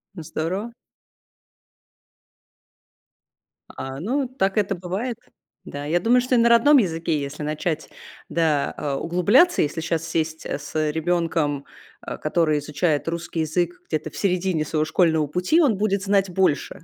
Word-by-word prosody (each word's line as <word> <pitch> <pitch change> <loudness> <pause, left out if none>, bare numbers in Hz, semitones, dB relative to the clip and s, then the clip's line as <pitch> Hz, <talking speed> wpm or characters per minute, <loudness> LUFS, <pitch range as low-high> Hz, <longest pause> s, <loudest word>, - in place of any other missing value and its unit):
Ну, 165 - -7
здорово. 190 +10 -3 3.0
А, 135 0 -7
ну, 255 - -1
так 200 -6 -1
это 195 -1 +1
бывает. 190 +7 -4 0.5
Да, 145 0 -6
я 175 +3 +1
думаю, 240 +4 +4
что 250 +1 +1
и - - +4
на 235 0 +4
родном 260 +6 +6
языке, 165 - 0
если 140 +2 -6
начать, 155 +1 -3 0.4
да, 155 -4 +1
а, 145 -2 -2
углубляться, 200 - +3
если 150 +2 -1
щас 165 0 -2
сесть, 160 -1 -2
э, - - -3
с 155 +1 -2
ребёнком, 160 -3 0 0.4
э, - - -5
который 155 -1 +1
изучает 150 +1 -1
русский 170 0 -3
язык 175 +3 -1
где-то 155 - -2
в - - -12
середине 180 -4 0
своего 155 0 0
школьного 160 -1 +2
пути, 180 - +2
он 255 - +3
будет 200 -1 0
знать 195 -1 +2
больше. 180 -5 0
170 Hz, 145 wpm, -23 LUFS, 155-195 Hz, 3.0 s, родном